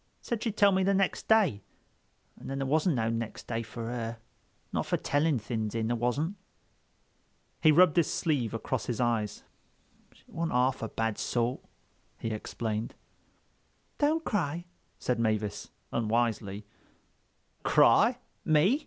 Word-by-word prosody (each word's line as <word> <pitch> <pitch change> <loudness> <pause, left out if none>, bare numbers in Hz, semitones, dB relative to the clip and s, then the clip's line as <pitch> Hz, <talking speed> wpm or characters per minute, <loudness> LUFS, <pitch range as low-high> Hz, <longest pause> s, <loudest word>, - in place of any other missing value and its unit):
Said 235 -3 -3
she'd 220 -3 -2
tell 200 -1 +6
me 190 0 +2
next 195 0 +1
day. 200 - +4 0.7
An' - - -11
then 135 - -3
there 135 - -1
wasn't 155 +4 +2
no 115 -2 0
next 115 -1 -4
day 115 -1 -2
for 115 +1 -7
her—not 115 -1 -6
fer - - +1
telling 145 0 +1
things 110 -1 -3
in, 115 -1 0
there 120 - +1
wasn't." 140 - -1 1.2
He 155 - +7
rubbed 175 +1 +5
his 170 - +3
sleeve 140 -9 0
across 115 +1 -3
his 120 - -2
eyes. 115 -4 0 0.7
"She - - -24
wasn't 165 0 -3
half 130 +1 +2
a 115 - -3
bad 115 -1 -2
sort," 120 +1 0 0.6
he 115 - -3
explained. 110 0 -3 1.0
"Don't 310 +2 +2
cry," 175 -4 -1 0.3
said 125 -2 -1
Mavis 110 -2 -1 0.2
unwisely. 110 -3 0 1.0
"Cry? - - +5 0.3
Me?" 160 - +4
120 Hz, 135 wpm, -29 LUFS, 115-165 Hz, 1.2 s, He